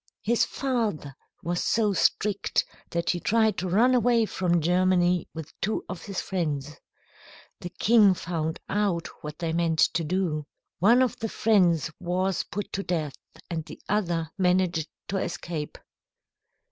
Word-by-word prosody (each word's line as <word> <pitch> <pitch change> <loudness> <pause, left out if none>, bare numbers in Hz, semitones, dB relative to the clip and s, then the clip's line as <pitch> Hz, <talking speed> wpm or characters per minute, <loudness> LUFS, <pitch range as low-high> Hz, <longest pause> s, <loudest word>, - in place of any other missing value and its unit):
His 235 +2 +2
father 225 - -2 0.3
was 175 +1 -1
so 215 -3 +2
strict 200 +1 +1 0.2
that 170 0 0
he 175 - -2
tried 220 +2 +2
to 185 - -2
run 235 +8 +4
away 240 -2 +3
from 175 -4 +1
Germany 180 +1 +2
with 160 -1 -7
two 215 +2 -1
of 185 - -6
his 195 -2 -4
friends. 150 -6 -3 0.8
The 175 - -6
king 205 0 +4
found 165 -2 -3
out 195 -5 0 0.2
what 150 0 -6
they 165 -2 -2
meant 165 -1 +1
to 165 - +3
do. 155 -3 -1 0.3
One 235 +8 +5
of 255 - -2
the 225 - -2
friends 180 -9 +2
was 185 +1 0
put 205 +4 -6
to 195 - -1
death, 160 -7 -2 0.3
and 165 -2 -3
the - - -11
other 170 -6 0
managed 180 -3 +2 0.2
to 195 - -1
escape." 170 -4 -4
180 Hz, 145 wpm, -26 LUFS, 165-205 Hz, 0.8 s, One